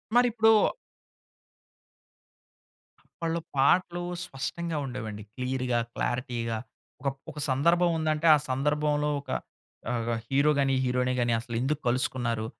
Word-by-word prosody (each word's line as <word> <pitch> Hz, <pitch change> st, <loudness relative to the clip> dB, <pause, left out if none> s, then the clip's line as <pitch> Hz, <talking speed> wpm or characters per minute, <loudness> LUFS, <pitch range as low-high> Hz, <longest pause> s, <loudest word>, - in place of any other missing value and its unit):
మరిప్పుడు 235 Hz, -2 st, +5 dB, 2.7 s
అప్పట్లో 165 Hz, 0 st, -1 dB, 0.2 s
పాటలు 175 Hz, +6 st, +3 dB, 0.2 s
స్పష్టంగా 165 Hz, +4 st, -4 dB
ఉండేవండి. 110 Hz, -5 st, -5 dB
క్లియర్‌గా, 125 Hz, -1 st, -1 dB, 0.2 s
క్లారిటీగా 120 Hz, -2 st, -2 dB, 0.4 s
ఒక 140 Hz, -, -2 dB
ప్ -, -, -37 dB
ఒక 150 Hz, -, -8 dB
సందర్భం 170 Hz, +7 st, +3 dB
ఉందంటే 155 Hz, 0 st, 0 dB
ఆ -, -, +3 dB
సందర్భంలో 150 Hz, +2 st, +1 dB
ఒక -, -, -18 dB, 0.6 s
ఆహ్, 115 Hz, -1 st, -1 dB, 0.2 s
హీరో 140 Hz, +4 st, +3 dB
గాని, 135 Hz, -1 st, +2 dB
హీరోయిన్ 125 Hz, 0 st, +1 dB
గాని 120 Hz, -1 st, +2 dB
అసలెందుకు 130 Hz, +5 st, -2 dB
కలుసుకున్నారు? 120 Hz, -2 st, 0 dB
135 Hz, 105 wpm, -28 LUFS, 125-155 Hz, 2.7 s, మరిప్పుడు